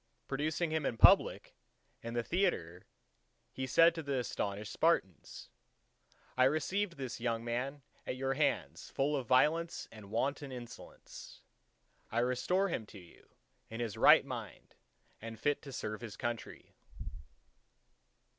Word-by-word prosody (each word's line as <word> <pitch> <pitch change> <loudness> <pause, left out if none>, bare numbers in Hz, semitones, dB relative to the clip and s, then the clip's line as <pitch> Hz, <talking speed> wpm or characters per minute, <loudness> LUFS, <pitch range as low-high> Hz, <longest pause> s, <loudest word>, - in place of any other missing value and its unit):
Producing 155 +4 -1
him 160 -1 0
in 120 - -2
public - - +5 0.5
in 115 0 -6
the 120 - 0
theatre, 115 - -1 0.6
he 130 0 -4
said 165 +6 +6
to 165 - -5
the 140 -3 -2
astonished 105 -3 -3
Spartans:—"I 130 - -2
received 170 +6 0
this 130 -3 -5
young 115 -1 -2
man 130 +4 -3 0.2
at - - -2
your 135 +1 -1
hands 145 0 -1
full 145 +2 0
of 135 -3 -3
violence 155 +6 +2
and 105 -3 -12
wanton 135 +5 -2
insolence; 120 -1 -11 0.7
I 115 - -3
restore 150 +11 +1
him 110 -10 -3
to - - -12
you 90 -2 -18 0.4
in 115 - -7
his 115 -4 -3
right - - +7
mind - - -8 0.5
and 115 0 -8
fit 145 -1 0
to 140 - -10
serve 110 -4 -5
his 115 -4 -8
country." 120 -2 -5
130 Hz, 135 wpm, -33 LUFS, 115-150 Hz, 0.7 s, right